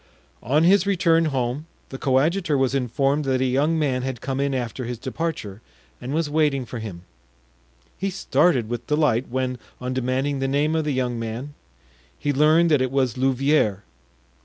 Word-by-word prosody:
On 145 Hz, +7 st, +2 dB
his 195 Hz, +2 st, +4 dB
return 170 Hz, -4 st, +3 dB
home 135 Hz, +1 st, -2 dB, 0.2 s
the 135 Hz, -, -7 dB
coadjutor 150 Hz, +4 st, +1 dB
was 135 Hz, -1 st, +1 dB
informed 135 Hz, +3 st, 0 dB
that 130 Hz, -1 st, +1 dB
a 130 Hz, -, +1 dB
young 140 Hz, +6 st, +1 dB
man 135 Hz, -5 st, 0 dB
had 130 Hz, -2 st, -4 dB
come 135 Hz, +2 st, -3 dB
in 140 Hz, -1 st, 0 dB
after 125 Hz, 0 st, -3 dB
his 120 Hz, 0 st, -4 dB
departure 125 Hz, -6 st, -4 dB, 0.4 s
and 130 Hz, -, -5 dB
was 160 Hz, +1 st, 0 dB
waiting 145 Hz, -3 st, +1 dB
for 120 Hz, 0 st, -7 dB
him; 95 Hz, -6 st, -7 dB, 1.0 s
he 195 Hz, -, -1 dB
started 175 Hz, -, +2 dB
with 120 Hz, +1 st, -5 dB
delight 150 Hz, -5 st, +1 dB
when, 130 Hz, 0 st, -2 dB, 0.2 s
on 125 Hz, 0 st, -3 dB
demanding 130 Hz, +2 st, -1 dB
the 135 Hz, -, 0 dB
name 145 Hz, +3 st, +1 dB
of 160 Hz, -1 st, 0 dB
this 145 Hz, -3 st, -1 dB
young 125 Hz, -2 st, -1 dB
man, 115 Hz, +6 st, -5 dB, 0.6 s
he 145 Hz, -, -1 dB
learned 155 Hz, +4 st, +4 dB
that 145 Hz, -4 st, +4 dB
it 130 Hz, -, +1 dB
was 130 Hz, -3 st, 0 dB
Louvieres. 130 Hz, -5 st, +1 dB
135 Hz, 175 wpm, -23 LUFS, 125-150 Hz, 1.0 s, his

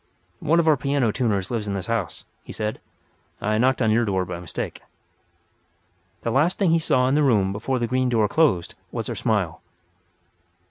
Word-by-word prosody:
"One 165 Hz, +3 st, +2 dB
of 165 Hz, -, +1 dB
our 155 Hz, -2 st, +5 dB
piano 140 Hz, -4 st, +1 dB
tuners 100 Hz, -6 st, -1 dB
lives 110 Hz, -3 st, -2 dB
in 100 Hz, -, -2 dB
this 95 Hz, -2 st, -4 dB
house," 115 Hz, -7 st, -3 dB, 0.2 s
he -, -, -10 dB
said. 105 Hz, 0 st, -3 dB, 0.6 s
"I 110 Hz, +1 st, 0 dB
knocked 130 Hz, +1 st, +2 dB
at 110 Hz, -, +3 dB
your 115 Hz, +2 st, +3 dB
door 95 Hz, -4 st, 0 dB
by 85 Hz, -, -6 dB
mistake." 90 Hz, -2 st, -5 dB, 1.4 s
The 115 Hz, -, -1 dB
last 150 Hz, +9 st, +2 dB
thing 190 Hz, -5 st, +2 dB
he 165 Hz, -, +4 dB
saw 130 Hz, -5 st, +2 dB
in 130 Hz, -, +1 dB
the 150 Hz, -, +3 dB
room 105 Hz, -9 st, +3 dB
before 115 Hz, +6 st, -2 dB
the 120 Hz, -, 0 dB
green 130 Hz, +1 st, 0 dB
door 110 Hz, -3 st, +2 dB
closed 105 Hz, -, +2 dB, 0.2 s
was -, -, -4 dB
her -, -, -3 dB
smile. -, -, -1 dB
115 Hz, 190 wpm, -23 LUFS, 105-135 Hz, 1.4 s, our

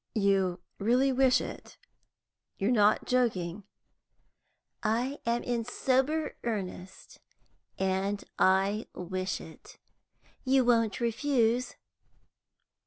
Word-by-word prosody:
"You 195 Hz, -4 st, +1 dB, 0.2 s
really 250 Hz, +6 st, +3 dB
wish 260 Hz, -1 st, +4 dB
it? -, -, -8 dB, 0.8 s
You 195 Hz, -, 0 dB
are -, -, +3 dB
not 210 Hz, -3 st, +3 dB
joking?" 205 Hz, -7 st, 0 dB, 1.2 s
"I 245 Hz, +6 st, -1 dB
am 235 Hz, +1 st, +1 dB
in 240 Hz, -2 st, -1 dB
sober 265 Hz, +6 st, 0 dB
earnest, 190 Hz, -5 st, -6 dB, 0.6 s
and 190 Hz, +2 st, -1 dB, 0.2 s
I 195 Hz, +3 st, +2 dB
wish 185 Hz, +1 st, -3 dB
it. 420 Hz, -, -13 dB, 0.7 s
You 260 Hz, -1 st, +3 dB
won't 230 Hz, -3 st, +2 dB
refuse?" 240 Hz, 0 st, +1 dB
225 Hz, 95 wpm, -29 LUFS, 195-255 Hz, 1.2 s, wish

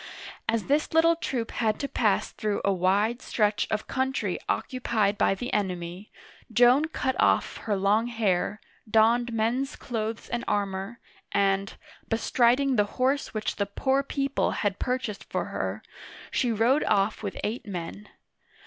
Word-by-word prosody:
As 225 Hz, -2 st, +1 dB
this 295 Hz, +3 st, 0 dB
little 330 Hz, +1 st, +5 dB
troop 250 Hz, -8 st, -3 dB
had 220 Hz, -3 st, 0 dB
to 280 Hz, -, -1 dB
pass 215 Hz, -7 st, +1 dB
through 210 Hz, -1 st, -2 dB
a 200 Hz, -, +3 dB
wide 200 Hz, +6 st, +1 dB
stretch 210 Hz, -2 st, +1 dB
of 215 Hz, 0 st, -1 dB
country 265 Hz, 0 st, -1 dB
occupied 225 Hz, -6 st, 0 dB
by 195 Hz, -, +2 dB
the 245 Hz, +6 st, -5 dB
enemy, 180 Hz, -1 st, -3 dB, 0.4 s
Joan 245 Hz, +6 st, +5 dB
cut 270 Hz, -4 st, -2 dB
off -, -, +2 dB
her 210 Hz, -, -2 dB
long 205 Hz, +4 st, +2 dB
hair, 210 Hz, -3 st, 0 dB, 0.3 s
donned 235 Hz, +2 st, +4 dB
men's 235 Hz, +5 st, 0 dB
clothes 225 Hz, -2 st, -4 dB
and 240 Hz, 0 st, -3 dB
armor, 200 Hz, +2 st, -2 dB, 0.3 s
and, 195 Hz, 0 st, +1 dB, 0.3 s
bestriding 245 Hz, +3 st, +2 dB
the 210 Hz, -, +4 dB
horse 265 Hz, 0 st, 0 dB
which 215 Hz, -, -2 dB
the 200 Hz, -, 0 dB
poor 265 Hz, +7 st, +1 dB
people 275 Hz, 0 st, -1 dB, 0.2 s
had 200 Hz, -1 st, 0 dB
purchased 250 Hz, -5 st, -2 dB
for -, -, -1 dB
her -, -, -3 dB
use, -, -, -27 dB, 0.4 s
she 245 Hz, -, +1 dB
rode 230 Hz, +6 st, +3 dB
off 205 Hz, +1 st, +1 dB
with 200 Hz, -3 st, -5 dB
eight 220 Hz, +2 st, -3 dB
men. 190 Hz, +2 st, -6 dB
225 Hz, 150 wpm, -27 LUFS, 200-255 Hz, 0.4 s, little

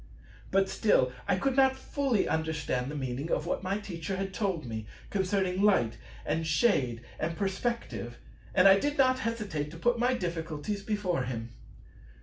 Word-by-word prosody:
But 195 Hz, 0 st, +3 dB
still 130 Hz, -12 st, +3 dB, 0.2 s
I 195 Hz, -, +3 dB
could 260 Hz, +7 st, 0 dB
not 265 Hz, -1 st, +5 dB
fully 265 Hz, -4 st, 0 dB
understand 150 Hz, -5 st, -1 dB
the 150 Hz, -, -5 dB
meaning 135 Hz, +2 st, -3 dB
of 155 Hz, -, 0 dB
what 175 Hz, -, -1 dB
my 190 Hz, +2 st, -1 dB
Teacher 190 Hz, -3 st, -4 dB
had 195 Hz, 0 st, -3 dB
told 190 Hz, -, -1 dB
me 110 Hz, -2 st, -5 dB, 0.2 s
concerning 190 Hz, -1 st, 0 dB
"light" 190 Hz, -, +3 dB, 0.3 s
and 160 Hz, +2 st, -1 dB
"shade" 140 Hz, -, +2 dB, 0.2 s
and 165 Hz, +1 st, -2 dB
"perspective"; 190 Hz, -, -2 dB, 0.4 s
and 185 Hz, +1 st, +7 dB
I 195 Hz, 0 st, +8 dB
did 290 Hz, +4 st, -1 dB
not 255 Hz, -1 st, +4 dB
hesitate 210 Hz, -, -2 dB
to 165 Hz, -, -10 dB
put 240 Hz, +6 st, +1 dB
my 250 Hz, +2 st, +3 dB
difficulties 170 Hz, 0 st, -3 dB
before 195 Hz, -9 st, -1 dB
him. 115 Hz, -2 st, -5 dB
185 Hz, 160 wpm, -30 LUFS, 150-210 Hz, 0.4 s, I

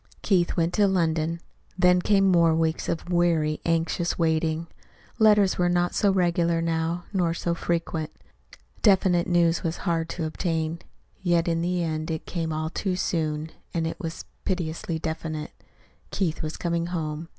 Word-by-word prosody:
Keith 180 Hz, -4 st, +2 dB
went 170 Hz, +1 st, +1 dB
to 205 Hz, -2 st, +4 dB
London. 165 Hz, -3 st, 0 dB, 0.4 s
Then 180 Hz, 0 st, +4 dB
came 195 Hz, +1 st, +3 dB
more 170 Hz, -4 st, +4 dB
weeks 160 Hz, 0 st, 0 dB
of 170 Hz, +2 st, -3 dB
weary, 165 Hz, -3 st, +2 dB
anxious 165 Hz, +1 st, 0 dB
waiting. 160 Hz, 0 st, +1 dB, 0.5 s
Letters 210 Hz, -4 st, +5 dB
were 175 Hz, 0 st, +3 dB
not 175 Hz, 0 st, +1 dB
so 200 Hz, -, +3 dB
regular 170 Hz, -2 st, +2 dB
now, 165 Hz, +1 st, -1 dB
nor 175 Hz, -3 st, +1 dB
so 170 Hz, 0 st, -1 dB
frequent. 165 Hz, -2 st, -2 dB, 0.7 s
Definite 190 Hz, -4 st, +4 dB
news 170 Hz, -2 st, +3 dB
was 165 Hz, 0 st, -2 dB
hard 165 Hz, -2 st, 0 dB
to 165 Hz, -1 st, -3 dB
obtain. 160 Hz, 0 st, -2 dB, 0.4 s
Yet 175 Hz, -2 st, +2 dB
in 165 Hz, -1 st, +1 dB
the 175 Hz, 0 st, 0 dB
end 155 Hz, -1 st, -2 dB
it 160 Hz, -1 st, -3 dB
came 165 Hz, -2 st, -3 dB
all 155 Hz, +1 st, -2 dB
too 185 Hz, +1 st, -1 dB
soon 155 Hz, -3 st, -1 dB, 0.2 s
and 165 Hz, -1 st, 0 dB
it 165 Hz, -, -4 dB
was 165 Hz, -4 st, -6 dB, 0.2 s
piteously 170 Hz, -3 st, -2 dB
definite. 160 Hz, -1 st, -4 dB, 0.6 s
Keith 170 Hz, -5 st, -1 dB
was 155 Hz, 0 st, -4 dB
coming 170 Hz, -1 st, -1 dB
home. 160 Hz, -2 st, -4 dB
170 Hz, 155 wpm, -25 LUFS, 160-175 Hz, 0.7 s, Letters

